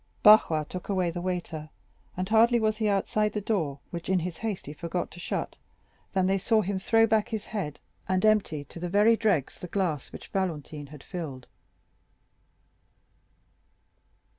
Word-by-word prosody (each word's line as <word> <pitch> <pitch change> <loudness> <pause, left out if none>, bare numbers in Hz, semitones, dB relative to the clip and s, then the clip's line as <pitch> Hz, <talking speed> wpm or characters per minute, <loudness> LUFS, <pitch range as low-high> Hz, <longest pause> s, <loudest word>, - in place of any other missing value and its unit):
Barrois 190 -7 +7
took 180 +6 -8
away 185 -3 +1
the 175 - -5
waiter, 175 -4 -4 0.5
and 185 +1 -1
hardly 230 +3 +5
was 215 -1 +1
he 215 -1 0
outside 210 +1 +1
the 210 - -1
door, 180 -10 -1
which 170 0 -6
in 190 - +3
his 170 -1 -4
haste 220 -4 -3
he 145 - -7
forgot 170 +3 -3
to 175 - -11
shut, - - -3 0.6
than 190 -1 +2
they 195 +1 +2
saw 220 +2 +2
him 195 0 -2
throw 225 +3 +4
back 220 -1 +2
his 220 -2 -4
head 185 -9 -4 0.3
and 185 +2 +2
empty 205 -9 +2
to 170 - -11
the 175 +1 -3
very 210 +5 +5
dregs 200 - 0
the 180 - -6
glass 170 -7 -2
which - - -10
Valentine 155 -6 -3
had 150 -1 -12
filled. 150 -9 -6
185 Hz, 165 wpm, -28 LUFS, 165-215 Hz, 0.6 s, Barrois